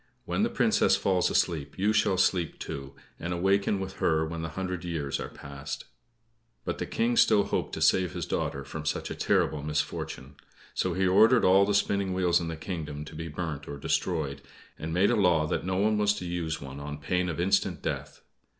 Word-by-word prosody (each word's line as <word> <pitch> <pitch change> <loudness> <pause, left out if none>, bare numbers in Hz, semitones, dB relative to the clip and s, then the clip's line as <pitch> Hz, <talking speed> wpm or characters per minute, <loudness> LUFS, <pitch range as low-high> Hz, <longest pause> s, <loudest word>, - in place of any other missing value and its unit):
"When - - -1
the - - +2
Princess - - +3
falls 95 -2 +2
asleep, 75 -5 0
you 100 +3 +2
shall 100 -3 +2
sleep, 90 -3 +1
too; 70 -1 -7 0.2
and 85 +2 -3
awaken 95 +3 +2
with 95 0 -6
her 80 -1 +2
when 80 +1 -5
the 80 - -3
hundred 90 -2 -3
years 80 -5 -2
are - - -5
passed." 70 0 -7 0.8
But - - -3
the - - -3
King 120 +1 +1
still 105 -3 +5
hoped - - -2
to - - -5
save 90 -3 +3
his - - -3
daughter 70 - -2
from 75 +3 -7
such 80 - -2
a - - -3
terrible 75 -2 +1
misfortune. 75 -2 -3 0.4
So 90 -2 -1
he 95 +1 +2
ordered 110 +6 +5
all 95 +2 +6
the 105 - +2
spinning 100 -2 +1
wheels 90 -2 +3
in 85 - -3
his 80 - -5
kingdom 75 -4 -5
to 75 - -11
be 80 +1 -5
burnt 80 -2 -5
or 70 - -6
destroyed, 75 -1 -1 0.3
and 80 +1 -5
made 90 +6 +3
a - - +3
law 90 -7 +3
that 75 - -2
no 95 - 0
one 105 +2 +2
was 105 0 +3
to 90 - -6
use 85 -2 -2
one 70 0 -8
on 75 +1 -6
pain 90 +5 -1
of 85 - -4
instant 95 -2 +1
death. - - -4
85 Hz, 205 wpm, -28 LUFS, 75-95 Hz, 0.8 s, all